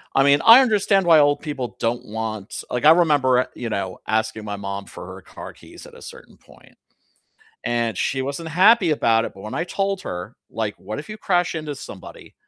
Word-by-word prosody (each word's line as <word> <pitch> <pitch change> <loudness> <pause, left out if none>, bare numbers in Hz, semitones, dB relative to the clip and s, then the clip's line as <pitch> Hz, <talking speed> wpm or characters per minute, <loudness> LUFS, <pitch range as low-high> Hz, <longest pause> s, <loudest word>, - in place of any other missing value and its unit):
I 135 - +5
mean, 140 +1 +4
I 230 +3 +10
understand 205 -5 +2
why 165 -2 +6
old 145 0 +3
people 140 -6 -5
don't 115 +1 -2
want 110 -1 -5
like, 125 - -2
I 155 - +9
remember 145 -7 +3
a - - -1
you 120 - -5
know, 95 -3 -4
asking 110 0 -1
my 105 - -4
mom 100 0 -6
for - - -10
her - - -11
car - - -11
keys - - -14
at - - -15
a - - -14
certain - - -13
point, - - -21 0.9
and 115 -4 -1
she 135 -1 -1
wasn't 140 +5 -5
happy 185 +1 +5
about 115 -6 +2
it, - - -6
but 95 - -13
when 110 - -7
I 165 - -1
told 195 0 -2
her 90 +5 -7
like, 110 -2 -4
"What 105 +6 -7
if 155 - -13
you 215 0 -8
crash 175 -4 0
into 155 -2 -5
somebody, 100 -8 -11
135 Hz, 210 wpm, -21 LUFS, 110-170 Hz, 0.9 s, I